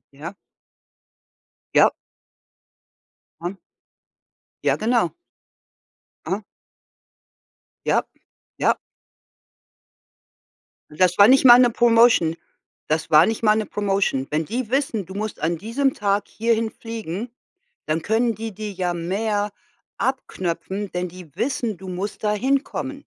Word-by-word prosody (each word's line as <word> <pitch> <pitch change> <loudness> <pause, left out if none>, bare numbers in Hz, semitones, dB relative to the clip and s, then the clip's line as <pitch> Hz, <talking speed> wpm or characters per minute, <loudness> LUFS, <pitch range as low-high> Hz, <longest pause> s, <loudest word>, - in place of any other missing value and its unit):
Ja. 155 +7 -8 1.4
Ja. - - +6 1.5
Hm. 175 +3 -5 1.1
Ja, - - +2
genau. 225 -5 +1 1.2
Aha. - - -2 1.4
Ja, - - +3 0.6
ja. - - +2 2.1
Das 180 +3 +2
war 200 +2 +8
nicht 265 +1 +5
mal 240 -1 +10
'ne 245 -1 +5
Promotion 230 -8 +4 0.6
das 155 +1 0
war 155 +2 +7
nicht 225 +1 -2
mal 215 -1 +5
'ne 215 -1 -1
Promotion. 195 -10 0
Wenn 155 +1 -1
die 240 +2 -3
wissen, 260 -7 0
du 185 - -11
musst 210 +2 -4
an 165 +2 -1
diesem 260 - 0
Tag 200 0 0
hierhin 225 0 0
fliegen, 225 -2 -6 0.6
dann 155 +1 -1
können 225 +5 +1
die 225 +1 -6
dir 210 +1 -5
ja 180 -2 -2
mehr 205 +4 -1 0.5
abknöpfen, 195 -5 -3
denn 180 0 -2
die 180 -2 -12
wissen, 240 -5 -1
du 190 +1 -10
musst 190 +4 -5
da 210 - +2
hinkommen. 270 +4 -1
210 Hz, 115 wpm, -22 LUFS, 180-230 Hz, 2.1 s, mal